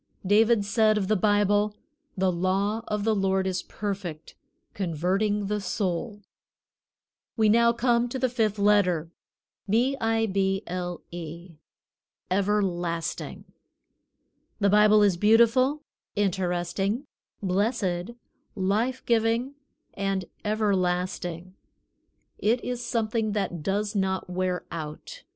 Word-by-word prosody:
David 215 +2 +4
said 215 +1 +3
of 195 -2 -1
the 215 - +4
Bible: 205 +1 +2 0.4
"The 190 0 +2
law 195 +5 0
of 210 -1 -2
the 220 +1 +2
Lord 190 -1 +1
is 185 -1 -1
perfect, 190 -7 -5 0.4
converting 195 +4 0
the 210 +1 -2
soul." 200 +2 -3 1.1
We 220 -1 +4
come 235 +1 +3
now 240 - -1
to 245 - -4
the 260 0 +1
fifth 220 -4 0
letter, 190 -6 +2 0.6
B 245 +6 +2
I 225 0 +2
B 195 -1 0
L 175 0 -4
E 170 0 -8 0.7
Everlasting. 185 -4 -1 1.1
The 200 -2 +3
Bible 210 0 +6
is 195 -4 +3
Beautiful, 235 - +4 0.3
Interesting, 195 - -1 0.4
Blessed, 195 +1 -1 0.4
Life 215 +7 0
giving, 230 +3 +1 0.4
and 195 -1 -2 0.2
Everlasting. 185 -4 -1 0.9
It 230 +4 +2
is 245 -1 -3
something 225 -2 -1
that 195 -5 -2
does 205 +5 -1
not 190 -1 0
wear 180 -1 -1
out. 165 - -7
205 Hz, 110 wpm, -26 LUFS, 185-220 Hz, 1.1 s, Bible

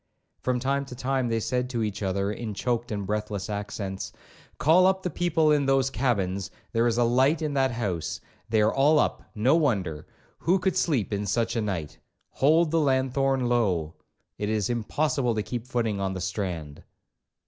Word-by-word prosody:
From 125 -1 0
time 140 +2 0
to 125 - -9
time 130 0 -1
they 115 0 +1
said 125 +2 -1
to 120 -3 -1
each 105 -1 -3
other, 100 +1 0
in 110 -1 -5
choaked 120 +2 -1
and 100 -2 -3
breathless 105 -1 -3
accents, 100 -2 -4 0.5
'Call 175 +5 +5
up 190 0 +1
the 180 - -2
people 165 -2 +2
in 145 -2 +2
those 135 -1 +2
cabins—there 115 0 -1
is 115 -1 +1
a 120 - +4
light 130 +7 +3
in 150 -2 -1
that 135 -1 +2
house—they 105 0 -3
are 110 - +2
all 145 +3 +4
up—no 130 -2 +1
wonder—who 115 - -1
could 190 0 0
sleep 130 - +1
in 100 0 -2
such 115 +4 0
a 115 - +1
night—hold 130 - 0
the 165 - +3
lanthorn 135 -2 +1
low—it 105 -2 -2
is 110 0 0
impossible 125 +1 0
to 105 - -1
keep 120 +1 -5
footing 115 -5 -1
on 95 -1 -1
the - - -3
strand.' 90 -6 -4
120 Hz, 165 wpm, -26 LUFS, 100-135 Hz, 0.5 s, Call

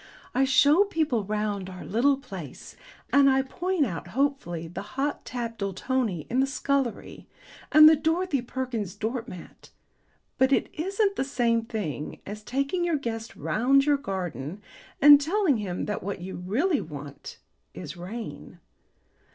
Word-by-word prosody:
I 265 +1 +3
show 290 +8 +5
people 310 - 0
round 210 -2 -2
our 185 -1 -9
little 265 +7 +2
place, 275 - -9 0.4
and 280 -1 +6
I 265 0 +3
point 350 +3 -1
out 175 -8 -5
hopefully 220 - -1
the 175 +4 -6 0.2
Hot 285 +2 -1
Tap 235 -2 -5
Doultonii 200 - -1
in 250 - 0
the 270 - +3
scullery, 275 -3 -2 0.4
and 310 +1 +9
the 315 - +8
Dorothy 320 -1 0
Perkins 240 -6 -4
doormat, 225 -5 -6 0.7
but 260 +1 +4
it - - +2
isn't 395 +4 0
the - - +1
same 235 -4 +1
thing 185 - -4
as 210 +2 -7
taking 275 - -1
your 340 -3 +1
guest 230 -4 -5
round 275 +5 +2
your 295 -1 +3
garden 185 - -5 0.4
and 290 0 +9
telling 335 - +2
him 190 -4 -3
that 210 - -3
what 200 +2 -4
you 185 +2 -7
really 255 - 0
want 145 -2 -9 0.4
is 90 - -7
rain. 205 +7 -8
245 Hz, 145 wpm, -26 LUFS, 200-285 Hz, 0.7 s, and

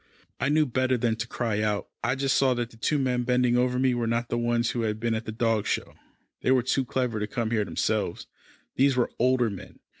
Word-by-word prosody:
I 130 - +1
knew 155 +1 +3
better 130 0 +1
than 115 -1 +1
to 115 - -3
cry 115 -4 -1
out. 105 -1 -1 0.2
I 125 +3 +1
just 135 -1 +1
saw 130 -2 +3
that 120 0 -3
the - - -16
two 150 +6 +1
men 125 -3 0
bending 125 0 +2
over 125 0 +2
me 130 0 +2
were 120 -1 -1
not 115 +1 -1
the 120 - -1
ones 120 0 +1
who 120 - -2
had 110 -1 -1
been 115 0 0
at 110 0 -3
the 110 - -4
dog 115 -1 0
show. - - -2 0.5
They - - 0
were 130 -2 +4
too 130 +1 0
clever 125 -3 -1
to 105 - -2
come 115 -2 -2
here 110 -3 +1
themselves. 85 -4 -1 0.5
These 135 0 +4
were 120 - +1
older 125 -2 +3
men. 95 - -10
120 Hz, 240 wpm, -26 LUFS, 115-130 Hz, 0.5 s, were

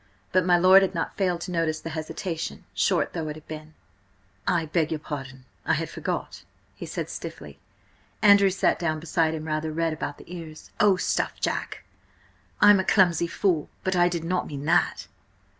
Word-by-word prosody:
But 185 -1 +2
my 175 -1 +5
lord 185 +2 +7
had 190 -1 0
not 165 - -3
failed 180 -4 0
to 180 - -5
notice 165 -2 0
the 165 - -7
hesitation, 160 +1 -5
short - - +1
though 165 -3 -3
it 150 - -4
had 155 - -14
been. 155 0 -9 0.7
"I–beg 165 -1 +1
your 160 - 0
pardon. 135 -4 -7 0.2
I - - +1
had - - -3
forgot," - - -4 0.3
he - - -8
said - - -4
stiffly. 70 -1 -8 0.6
Andrew 200 -2 +6
sat 190 - +1
down 155 -2 -1
beside 160 0 0
him, 155 0 -6
rather 155 0 -2
red 165 0 0
about 150 -2 -5
the 180 - -10
ears. 160 -2 -10
"Oh, 205 -2 +5
stuff, 180 - -1
Jack! - - -3 0.8
I'm 205 -1 +8
a - - +1
clumsy 175 -4 +3
fool, 170 -3 0
but 185 0 0
I 175 0 +4
did 170 -2 -3
not 180 +2 -1
mean 145 -1 -6
that!" 160 - +2
165 Hz, 180 wpm, -25 LUFS, 155-185 Hz, 0.8 s, I'm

